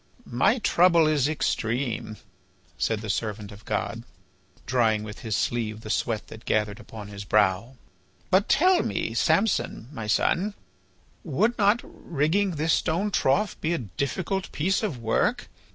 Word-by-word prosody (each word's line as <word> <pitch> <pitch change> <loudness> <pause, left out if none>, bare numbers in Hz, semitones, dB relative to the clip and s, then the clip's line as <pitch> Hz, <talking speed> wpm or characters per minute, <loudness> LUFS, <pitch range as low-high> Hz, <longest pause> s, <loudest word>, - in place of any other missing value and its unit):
"My 195 - +2
trouble 175 -6 +4
is 150 -2 +2
extreme," 120 -6 -2 0.6
said 110 -2 -1
the 110 - -6
servant 105 -1 -4
of 105 +1 -13
God, 105 +1 -2 0.6
drying 115 -4 +2
with 105 0 -8
his 110 -3 -2
sleeve 110 -2 -1
the 110 - -5
sweat 115 -3 -1
that 110 - -11
gathered 105 -1 0
upon 110 -2 -9
his 100 -1 -7
brow. 105 +4 +1 0.6
"But 190 +2 +3
tell 365 +3 +4
me, - - -2
Samson, 185 - +1
my 115 -7 -6
son, 190 - +1 0.7
would 195 - +1
not 210 +4 +4
rigging 170 +5 -1
this 155 +2 +1
stone 195 +6 0
trough 195 +6 +1
be 165 +2 0
a 120 - -6
difficult 190 +7 -2
piece 185 +6 0
of 200 - -2
work? 115 -1 0
130 Hz, 145 wpm, -26 LUFS, 110-180 Hz, 0.7 s, trouble